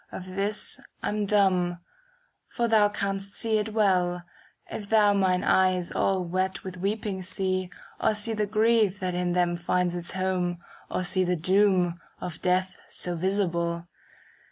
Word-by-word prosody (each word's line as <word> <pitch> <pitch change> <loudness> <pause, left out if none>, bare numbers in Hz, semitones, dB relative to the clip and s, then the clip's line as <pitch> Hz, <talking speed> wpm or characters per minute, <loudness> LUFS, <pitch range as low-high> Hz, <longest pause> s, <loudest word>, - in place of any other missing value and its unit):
Of 185 0 -8
this 200 +1 -2 0.2
I'm 210 -1 -1
dumb; 185 -4 +2 0.7
for 235 -1 -1
thou 215 -2 +5
canst 195 -1 -3
see 220 -1 +1
it 215 +1 -3
well, 180 -5 +2 0.4
If 205 -2 -7
thou 210 -2 +5
mine 185 -2 +2
eyes 185 -2 +2
all 190 -2 +1
wet 185 +2 -1
with 185 -1 -7
weeping 200 0 -2
see. 185 0 -2 0.3
Or 215 - +2
see 210 +2 -1
the 210 -1 0
grief 215 -2 +3
that 185 -1 -2
in 180 0 0
them 175 -1 +2
finds 175 +1 0
its 175 -1 -4
home, 185 -2 0
^ - - -18 0.3
Or 185 - -1
see 185 +1 +2
the 180 0 +1
doom, 185 0 +2 0.2
of 175 -2 -6
death 185 +1 0
so 175 -1 -3
visible. 170 -2 -1
185 Hz, 155 wpm, -27 LUFS, 180-205 Hz, 0.7 s, thou